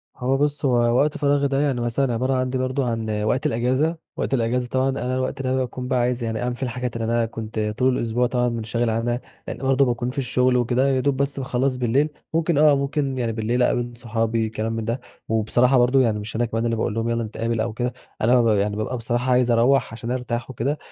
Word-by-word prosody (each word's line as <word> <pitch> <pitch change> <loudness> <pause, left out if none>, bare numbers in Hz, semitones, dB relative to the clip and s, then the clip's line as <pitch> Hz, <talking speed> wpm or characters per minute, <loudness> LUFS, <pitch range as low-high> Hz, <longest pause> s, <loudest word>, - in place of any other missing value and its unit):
هو 130 +1 0
بص، 145 0 0
هو 130 - +3 0.2
وقت 150 +3 +2
فراغي 145 -1 +2
ده 135 0 0
يعني 135 -5 0
مثلًا 120 +2 0
عبارة 130 +3 0
عندي 130 0 0
برضه 130 +1 -1
عن 110 -2 -2
وقت 115 +4 0
الأجازة، 130 +8 +1 0.2
وقت - - -2
الأجازة 125 0 0
طبعًا 130 +1 +1
أنا 130 -1 -2
الوقت 130 +1 -2
ده 130 0 0
باكون 125 -1 -3
بقى 125 -1 +1
عايز 120 0 0
يعني 110 -1 -2
أعمل 125 0 -1
فيه 130 - -6
الحاجات 125 0 -4
اللي 115 -1 -2
أنا 115 0 +1
كنت 110 0 -6 0.2
طول 130 0 +2
الأسبوع 120 +2 0
طبعًا 125 0 +1
مُنشغِل 115 +1 -1
عنها، 120 +2 -1 0.3
لإن - - -5
برضه 135 0 +2
باكون 120 0 -1
في 130 - -8
الشغل 125 -1 +2
وكده 120 +1 +1
ويا 135 -1 +2
دوب 140 0 +1
بس 140 0 -1
باخلّص 130 0 0
بالليل، 130 +5 +2 0.2
ممكن 165 -1 +1
آه، 150 -1 +6
ممكن 140 -1 -1
يعني 120 -2 -1
بالليل 115 +3 -1
اقابل 120 0 0
صحابي 115 -1 -1
كلام 110 +1 -3
ده 115 +3 -2 0.3
وبصراحة 120 +4 +3
برضه 125 +2 +4
يعني 110 -4 +1
مش 105 +2 -7
أنا 120 +2 +1
كمان 115 0 -2
اللي 115 0 +1
باقول 110 0 -1
لهم 115 +1 -1
يالّا 115 0 0
نتقابل 115 +1 -2
أو 115 - -2
كده، 125 +1 -2 0.3
أنا 120 +3 +4
مب 115 - +2
يعني 100 +1 0
بابقى 110 +4 -2
بصراحة 120 +2 -1
عايز 125 -1 +3
اروّح 120 +3 +3
عشان 115 +1 -5
ارتاح 125 -1 -3
وكده، 130 +4 -2
125 Hz, 225 wpm, -23 LUFS, 115-130 Hz, 0.3 s, آه